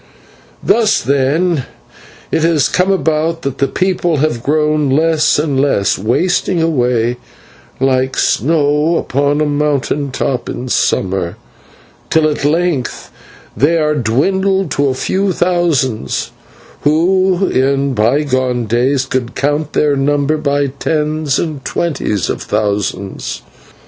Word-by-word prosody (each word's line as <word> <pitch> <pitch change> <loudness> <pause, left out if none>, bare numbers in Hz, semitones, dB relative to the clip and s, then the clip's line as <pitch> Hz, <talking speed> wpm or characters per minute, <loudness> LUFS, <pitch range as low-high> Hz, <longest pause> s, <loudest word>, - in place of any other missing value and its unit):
"Thus, 225 -2 +3
then, 140 +4 +1 0.7
has 160 - +1
it 160 -5 +2
come 185 +2 +2
about 160 -1 0
that 140 -1 -4
the 140 - +2
people 175 0 0
have 140 -5 0
grown 150 +1 +1
less 155 +3 +2
and 145 -3 0
less, 135 -8 +1
wasting 175 - 0
away 125 -7 +1 0.6
like 130 0 +1
snow 150 +4 +2
upon 145 0 0
a - - +2
mountain 145 -1 -1
top 130 -1 -2
in 125 +1 -5
summer, 95 -6 0 0.7
till 160 -1 +3
at 150 -2 -2
length 155 -3 -1 0.4
they 160 +5 +2
are 150 -1 +1
dwindled 190 - 0
to 145 0 +1
a 130 - 0
few 195 +8 0
thousands, 155 - 0 0.5
who 185 +5 +2
in 135 +1 +1
bygone 125 +1 +1
days 130 +4 +1
could 130 -2 -3
count 145 +1 -1
their 145 -1 +2
number 145 +2 +1
by 145 -1 0
tens 155 -2 0
and 150 -5 -3
twenties 130 - -2
of - - -3
thousands. 100 -2 -3
145 Hz, 120 wpm, -15 LUFS, 130-160 Hz, 0.7 s, Thus